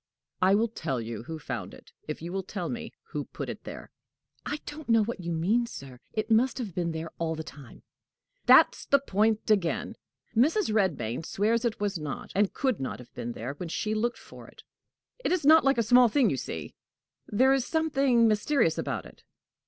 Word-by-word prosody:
"I 190 +2 +5
will 225 +3 +2
tell 155 - -3
you 115 -1 -5
who 160 - -5
found 110 -10 -6
it, - - -17 0.2
if 155 +1 -5
you 170 +2 -5
will 195 - -1
tell 185 -2 -5
me 240 - -5 0.2
who - - -3
put - - -6
it - - -7
there." - - -9 0.6
"I 295 - -2
don't 295 -3 -8
know 225 -1 +5
what 230 -1 -4
you 170 -1 -4
mean, 200 +9 +1
sir. 135 - -10
It 215 +1 -3
must 240 +4 +3
have 225 -8 -4
been 170 -1 -1
there 160 0 -5
all 165 -1 -1
the 160 - -5
time." 140 -4 -13 0.6
"That's - - +6
the 280 - +5
point 220 -4 +1
again! 190 -6 +1 0.4
Mrs. 305 - +3
Redmain 160 - 0
swears 225 +7 0
it 230 -1 -1
was 205 -4 -1
not, 150 -3 -6
and 200 0 +2
could 260 -6 0
not 130 - -4
have 125 - -14
been, 120 -1 -5
there 120 +5 -5
when 165 +4 -7
she 215 +6 -2
looked 235 +3 0
for - - -13
it. - - -16 0.6
It - - 0
is 360 -5 +1
not 315 +2 +8
like 270 -1 +3
a 230 - +3
small 245 +2 +6
thing, 250 -1 +3
you 135 - -1
see. 80 - -6 0.5
There 260 +6 +4
is 270 -2 +2
something 275 -7 +2
mysterious 215 - +2
about 135 -9 -3
it." - - -15
210 Hz, 205 wpm, -28 LUFS, 160-240 Hz, 0.6 s, not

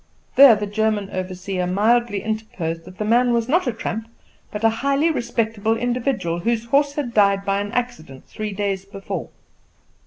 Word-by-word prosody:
There 270 -4 +9
the 210 0 -3
German 210 -1 -1
overseer 185 0 -3
mildly 210 +2 +2
interposed 190 -7 -4
that 185 - -13
the 215 - -2
man 240 +2 +3
was 235 -1 +1
not 320 +2 +2
a - - +2
tramp, 225 0 -5 0.4
but 210 +1 -6
a 225 - +6
highly 280 +4 +2
respectable 225 -4 -1
individual, 240 -8 -1
whose 230 +4 -1
horse 280 +4 +2
had 265 -6 -3
died 200 -1 +3
by 195 0 +1
an 205 0 -5
accident 240 - -4
three 215 -1 -5
days 195 -1 -2
before. 195 0 -6
220 Hz, 165 wpm, -22 LUFS, 195-240 Hz, 0.4 s, There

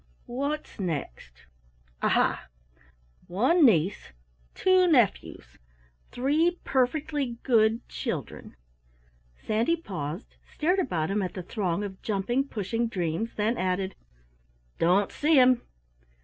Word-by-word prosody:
What's 280 +2 -4
next? 135 - -5 0.6
Aha! - - +1 0.8
One 260 - +3
niece, 185 - +2 0.4
two 370 -1 +4
nephews 225 - +1 0.5
three 310 +7 +1
perfectly 270 -1 0
good 225 -1 +2
children." - - -5 0.8
Sandy 225 - 0
paused, 180 - -6
stared 360 +5 +1
about 175 - -1
him 205 +1 0
at 185 -2 -4
the 185 - -5
throng 185 0 -2
of 190 -2 -7
jumping, 235 +7 -1
pushing 230 +1 -2
dreams 180 +1 -3
then 220 +3 0
added: 185 +1 -1 0.9
"Don't 185 +4 +3
see 305 +1 +2
'em." 250 -1 +5
225 Hz, 105 wpm, -27 LUFS, 185-275 Hz, 0.9 s, em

